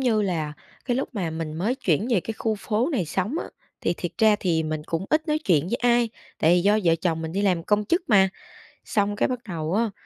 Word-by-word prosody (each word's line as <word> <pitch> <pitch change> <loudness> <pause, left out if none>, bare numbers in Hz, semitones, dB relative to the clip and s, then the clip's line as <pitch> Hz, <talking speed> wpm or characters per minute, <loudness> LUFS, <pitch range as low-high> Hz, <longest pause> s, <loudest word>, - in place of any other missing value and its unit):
như 230 -5 +2
là, 160 -6 -1 0.3
cái 245 -1 0
lúc 270 - -1
mà 175 -6 -2
mình 160 -1 -4
mới 205 +10 0
chuyển 205 - 0
về 205 -6 +3
cái 225 - -5
khu 220 -1 0
phố 220 +7 0
này 215 -10 +1
sống 190 - -2
á, - - -4 0.3
thì 170 - 0
thiệt 175 - -4
ra 215 -1 +5
thì 165 -3 +1
mình 155 -1 -3
cũng 165 +2 -2
ít 310 +1 +1
nói 300 0 +2
chuyện 170 - +1
với 235 - 0
ai, 240 -1 +3 0.3
tại 160 - +4
vì 180 - +3
do 205 +3 +3
vợ 165 -1 +5
chồng 165 -3 0
mình 160 0 -4
đi 200 +3 -1
làm 180 -4 +2
công 210 +1 +2
chức 340 - +1
mà. 195 -4 +5 0.6
Xong 205 -1 0
cái - - +2
bắt 250 -1 -2
đầu 165 0 -3
á, 230 0 +1
200 Hz, 250 wpm, -25 LUFS, 165-230 Hz, 0.6 s, ra